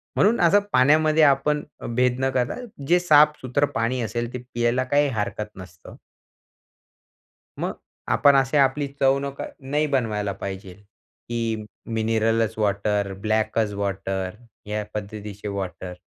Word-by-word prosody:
म्हणून 220 +4 +3
असं 175 +4 +5
पाण्यामध्ये 155 +4 +4
आपण 145 +1 +3 0.3
भेद 125 0 +2
न 130 0 +1
करता, 125 -1 0 0.3
जे 175 +1 +5
साफ 150 -3 +5
सुथरं 130 +3 +1
पाणी 120 +2 0
असेल, 120 +2 -3
ते - - -3 0.2
प्यायला 120 +2 +1
काही 145 +3 +2
हरकत 105 +1 -2
नसतं. 90 -2 -12 1.6
मग - - -2 0.4
आपण 140 -1 +5
अशी 135 +2 +2
आपली 140 +1 +2
चव 135 0 +4
नक 140 0 -5 0.2
नाही 145 +3 0
बनवायला 105 -5 0
पाहिजेल, 95 0 -7 0.5
की 115 -2 -2 0.3
मिनरलच 110 0 +1
वॉटर, 100 -1 0
ब्लॅकच 110 0 0
वॉटर, 95 -1 -3 0.3
या 105 0 -2
पद्धतीचे 105 0 -6
वॉटर. 95 -2 -5
115 Hz, 125 wpm, -24 LUFS, 105-140 Hz, 1.6 s, असं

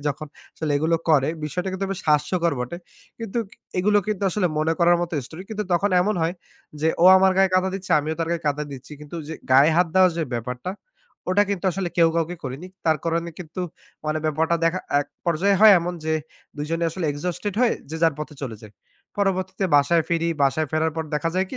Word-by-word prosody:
যখন 150 +2 -2 0.3
আসলে 155 -2 -3
এগুলো 160 +3 +2
করে 140 -2 +4 0.2
বিষয়টা 180 +5 -3
কিন্তু 190 +1 -2
বেশ 190 - -6
হাস্যকর 165 +3 +2
বটে! 125 +8 -4 0.4
কিন্তু 230 +1 -3 0.3
এগুলো 205 +3 +3
কিন্তু 210 -2 -2
আসলে 185 -1 +1
মনে 155 +1 +2
করার 175 0 +5
মতো 175 0 -3
story 170 +3 -9
কিন্তু 210 -1 -3
তখন 195 +3 +2
এমন 210 +4 +1
হয়, 165 +3 0 0.5
যে 160 - +2
ও - - +6
আমার 190 0 +5
গায়ে 190 0 +4
কাদা 185 +1 +3
দিচ্ছে, 190 -1 -7
আমিও 155 +2 -2
তার 165 0 -1
গায়ে 170 -1 -2
কাদা 145 +1 0
দিচ্ছি। 135 +2 -10
কিন্তু 150 +3 -8
যে 160 - -4 0.2
গায়ে 140 +4 +7
হাত 180 - +4
দেওয়া 185 -1 +6
যে 165 - 0
ব্যাপারটা, 125 +9 -4 0.6
ওটা 205 +2 +4
কিন্তু 195 -2 -3
আসলে 190 0 -2
কেউ 165 -1 +5
কাউকে 170 +2 -1
করেনি। 135 +7 -6 0.2
তার 160 -1 +3
করণে 170 +1 -1
কিন্তু 175 +1 -7 0.5
মানে 155 0 0
ব্যাপারটা 160 +2 +1
দেখা 170 +3 +1 0.2
এক 145 - -5 0.2
পর্যায়ে 190 +4 +2
হয় 215 -1 +9
এমন 175 +1 -3
যে 160 - 0 0.4
দুজনে 165 +3 -2
আসলে 175 0 -4
exhausted 180 +6 -4
হয়ে 245 - +3 0.2
যে 160 - -4
যার 165 -2 +4
পথে 150 0 -6
চলে 115 -5 -4
যাই। 105 - -12 0.5
পরবর্তীতে 190 -1 0
বাসায় 160 +4 +3
ফিরি, 170 -1 0
বাসায় 140 +3 +2
ফেরার 160 0 +1
পর 160 - -2
দেখা 150 +2 0
যায় 190 +1 +1
কি? 260 - -5
170 Hz, 205 wpm, -23 LUFS, 155-185 Hz, 0.6 s, হয়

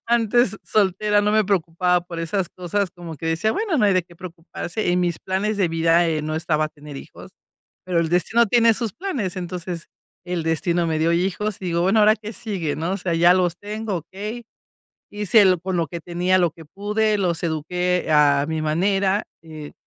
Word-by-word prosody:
Antes, 235 0 +2
soltera, 205 +1 +2
no 210 0 +1
me 215 -1 +3
preocupaba 180 -1 +1
por 170 -1 -7
esas 180 +2 -2
cosas, 185 +2 -2
como 170 -3 -9
que 165 +3 -6
decía: 165 +7 +1
"Bueno, 405 - -1
no 210 - +3
hay 200 - +4
de 185 - +2
qué 175 - -18
preocuparse". 175 +2 -5
En 180 - +2
mis 175 -2 -1
planes 200 +3 -1
de 195 - +2
vida, 165 +1 +3
eh, 155 -2 -1
no 155 +1 -3
estaba 155 -2 0
tener 145 -2 -11
hijos, - - -11 0.6
pero 175 -2 +1
el 165 -1 0
destino 225 +7 +2
tiene 230 +1 +4
sus 225 -3 -3
planes. 265 - -3
Entonces, 175 -1 -6 0.4
el 175 -2 -3
destino 170 +1 0
me 160 -1 -1
dio 165 +1 +2
hijos, 190 +4 -1
y 185 - -7
digo: 170 -1 0
"Bueno, 195 +5 +3
ahora 215 +1 +6
qué 215 +1 -8
sigue, 195 -11 -3
¿no?". 165 +4 -2
O - - -2
sea, 180 -3 -2
ya 175 +2 +6
los 180 -1 +1
tengo, 210 -1 -4
okey. 210 +8 -7 0.7
Hice 210 +1 +3
el 185 -3 +4
con 185 0 -3
lo 165 -2 0
que 170 +3 -6
tenía, 180 +2 +1
lo 175 -2 +2
que 165 - -14
pude, 210 +6 0
los 175 -4 -1
eduqué 180 +3 -1
a 145 -2 +4
mi 160 -1 -2
manera, 195 +5 +1 0.2
eh, 155 -2 -10
180 Hz, 200 wpm, -22 LUFS, 165-205 Hz, 0.7 s, ahora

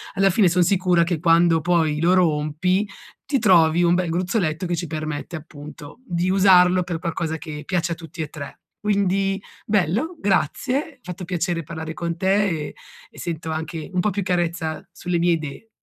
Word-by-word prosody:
alla 195 0 +4
fine 190 0 +4
son 180 +1 +3
sicura 180 -1 +3
che 170 -1 -1
quando 165 0 +4
poi, 160 -3 +1
lo 175 +2 +4
rompi, 175 +3 +1 0.4
ti 275 -1 +1
trovi 175 -5 +5
un 170 0 +4
bel 180 -1 0
gruzzoletto 175 -1 -1
che 175 0 -1
ci 170 +1 -4
permette, 155 +1 -4
appunto, 150 +1 -11
di 175 -4 -1
usarlo 185 -1 +5
per 170 -2 -4
qualcosa 165 -1 -2
che 150 -1 -7
piace 175 -1 0
a - - -6
tutti 165 +1 -9
e 155 - -2
3. 145 -2 -9 0.2
Quindi, 195 -1 +1 0.2
bello, 215 - 0
grazie, 255 - 0
fatto 180 -3 -7
piacere 175 -1 -2
parlare 160 +1 -6
con 170 0 -3
te, 195 +3 +2
e 155 -4 -4 0.4
e - - -15
sento 165 -1 -4
anche 160 0 -5
un 180 - +1
po' 210 - +1
più 200 0 -2
carezza 175 -3 -1
sulle 180 -1 -2
mie 175 +1 +2
idee. 160 +5 -3
175 Hz, 180 wpm, -22 LUFS, 160-185 Hz, 0.4 s, trovi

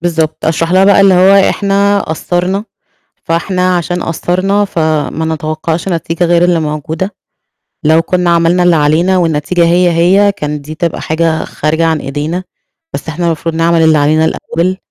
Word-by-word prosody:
بالضبط. 165 -2 -2
أشرح 165 +1 0
لها 190 +1 +4
بقى 200 0 +4
اللي 195 -1 +5
هو 190 +2 +5 0.2
إحنا 200 0 +1
قصّرنا، 180 +4 -2 0.6
فإحنا 180 +2 0
عشان 175 +1 -2
قصّرنا 185 +5 -1
فما 160 -3 -2
نتوقّعش 155 +3 -3
نتيجة 170 0 -2
غير 175 0 +3
اللي 175 -2 +2
موجودة. 155 +5 -4 0.7
لو 160 +2 +3
كنّا 180 0 -1
عملنا 170 +1 +2
اللي 175 -1 +3
علينا 160 +5 +2
والنتيجة 170 +1 0
هي، 175 +1 +2
هي 190 +5 +3
كانت 150 -6 -5
دي 155 - -7
تبقى 170 0 -3
حاجة 160 0 -1
خارجة 160 +2 -1
عن 160 -2 0
إيدينا، 150 +7 -4 0.5
بس 140 - -6
إحنا 170 +3 -3
المفروض 165 0 -2
نعمل 165 0 +2
اللي 160 -1 +4
علينا 155 +2 +2
الأول 175 +3 -2
170 Hz, 155 wpm, -12 LUFS, 160-180 Hz, 0.7 s, اللي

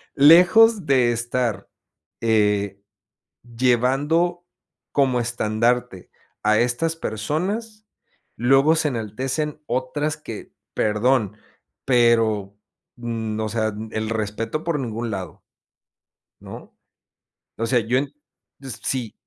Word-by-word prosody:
lejos 180 +8 +6
de 130 -4 +3
estar, 120 0 -2 0.5
eh, 105 -3 +1 0.6
llevando 135 +9 +1 0.5
como 130 -3 +2
estandarte 115 -2 -1 0.3
a 105 0 +3
estas 125 +8 0
personas, 190 - -3 0.5
luego 135 +6 +4
se 160 -1 +1
enaltecen 135 +6 -3
otras 140 +4 -2
que, 115 -8 -9 0.2
perdón, 110 0 +1 0.5
pero, 115 -5 +2 0.4
mm, 115 -2 -4
o 110 - -1
sea, 110 0 -1
n 110 +1 -6
el 110 0 -2
respeto 115 +6 -3
por 165 -3 -1
ningún 115 -2 -4
lado 95 -5 -6 1.0
¿No? - - -11 0.8
o 115 - -2
sea, 120 +1 +2
yo 115 +4 +1
en 140 +1 -3 0.5
s 135 -5 -8
sí 125 -5 -2
120 Hz, 105 wpm, -22 LUFS, 110-145 Hz, 1.0 s, lejos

